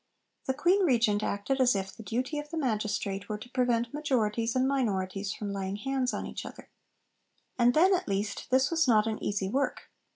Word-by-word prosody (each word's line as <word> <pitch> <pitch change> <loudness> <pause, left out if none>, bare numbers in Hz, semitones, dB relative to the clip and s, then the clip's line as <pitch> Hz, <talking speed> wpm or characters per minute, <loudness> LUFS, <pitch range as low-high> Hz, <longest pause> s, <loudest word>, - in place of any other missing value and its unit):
The 265 - 0
Queen 355 +7 +3
Regent 230 - +3
acted 215 +7 -1
as 245 -4 +4
if 195 -1 -3
'the - - -10
duty 255 +7 -2
of 295 0 -7
the 330 - -5
Magistrate' 210 -6 -2
were 210 - -2
to 245 +4 -12
prevent 240 -1 +1
majorities 235 -6 0
and 260 +1 +3
minorities 195 -7 -1
from 210 -1 -4
laying 195 0 -3
hands 260 +3 -1
on - - -4
each - - -6
other. - - -11 0.9
And, 245 +1 +4
then 370 +5 +5
at 360 - 0
least, 200 +1 -2
this 260 +3 +3
was 325 -3 +2
not 215 -3 +4
an 220 -1 -3
easy 200 -2 -1
work. 275 +8 -2
235 Hz, 195 wpm, -29 LUFS, 205-270 Hz, 0.9 s, then